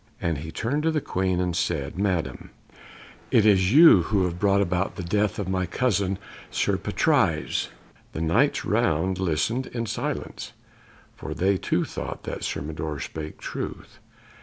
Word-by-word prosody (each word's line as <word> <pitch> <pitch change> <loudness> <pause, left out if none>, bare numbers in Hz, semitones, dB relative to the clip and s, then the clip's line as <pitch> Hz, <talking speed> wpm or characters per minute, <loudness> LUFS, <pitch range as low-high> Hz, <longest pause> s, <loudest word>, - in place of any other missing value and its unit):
And 80 -4 -1
he 80 +2 -7
turned 140 - -1
to 160 - +1
the 160 -1 +1
Queen 95 -7 -1
and 90 -2 -1
said 70 -4 -1
"Madam, 95 -5 -1 0.8
it 110 - +4
is 95 -2 +4
you 150 - +8
who 100 +2 +1
have 90 -1 -2
brought 100 0 +3
about 90 -1 0
the 95 - -5
death 105 +4 0
of 100 - -3
my 95 -1 -1
cousin 100 -1 0 0.3
Sir - - +1
Patrise!" - - +1 0.4
The 80 - -4
Knights 80 0 +2
round 90 +4 +1
listened 95 +9 0
in 115 -1 -4
silence, - - -4 0.6
for - - -6
they 95 +2 +2
too - - 0
thought - - -6 0.2
Sir - - -2
Mador 75 -1 -4
spake 75 +2 -6
truth. - - -6
95 Hz, 155 wpm, -25 LUFS, 85-105 Hz, 0.8 s, you